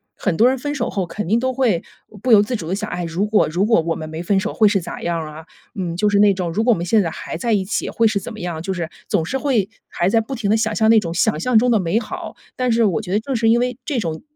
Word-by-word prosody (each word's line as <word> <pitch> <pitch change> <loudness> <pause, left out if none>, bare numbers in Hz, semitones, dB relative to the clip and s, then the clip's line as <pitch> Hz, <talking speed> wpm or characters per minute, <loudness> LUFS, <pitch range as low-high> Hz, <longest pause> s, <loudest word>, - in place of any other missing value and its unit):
很 190 -5 -1
多 235 - +6
人 265 - 0
分 290 +2 -3
手 240 -4 -2
后 195 -2 -2
肯 210 +1 -5
定 225 +3 +3
都 260 +1 -1
会 235 -10 +1 0.4
不 250 - 0
由 205 - +8
自 210 +5 -3
主 170 -8 -5
地 185 - 0
想， 215 +1 -4
唉， 175 -1 -3
如 170 +5 -1
果 210 0 +2
如 175 +6 0
果 225 -3 +4
我 165 0 -2
们 155 0 -7
没 160 +1 -5
分 195 +3 +1
手 210 +3 -3
会 215 - +4
是 200 -3 +1
咋 - - -7
样 170 0 -1
儿 155 -1 -6
啊？ 160 +1 -10 0.3
嗯， 180 -4 -3
就 210 +3 +2
是 205 - +2
那 205 -1 +5
种， 180 -3 -3
如 205 - 0
果 240 0 +4
我 - - -2
们 170 - -3
现 210 +4 +3
在 170 - -1
还 160 - -6
在 230 +4 0
一 200 - +2
起 215 - -2
会 230 - +1
是 215 -2 0
怎 195 - -8
么 220 - -10
样？ 175 -4 -4
就 190 +3 -3
是 170 -3 -4 0.2
总 160 - 0
是 265 - -2
会 255 -9 0 0.2
还 175 +2 0
在 225 - +3
不 265 +5 -6
停 220 -5 -2
地 220 - +4
想 220 -1 -1
象 220 0 +3
那 225 -1 +7
种 165 -4 -4
想 160 -3 +1
象 245 +6 +2
中 245 +2 +3
的 220 - +3
美 185 +4 +1
好。 - - -7 0.2
但 255 -1 0
是 230 0 +3
我 205 0 +1
觉 190 -4 -7
得 205 - +3
正 270 - -4
是 225 -1 +1
因 235 +1 +4
为 250 -1 -2
这 285 - -2
种 165 -3 -4
205 Hz, 345 characters per minute, -20 LUFS, 175-230 Hz, 0.4 s, 由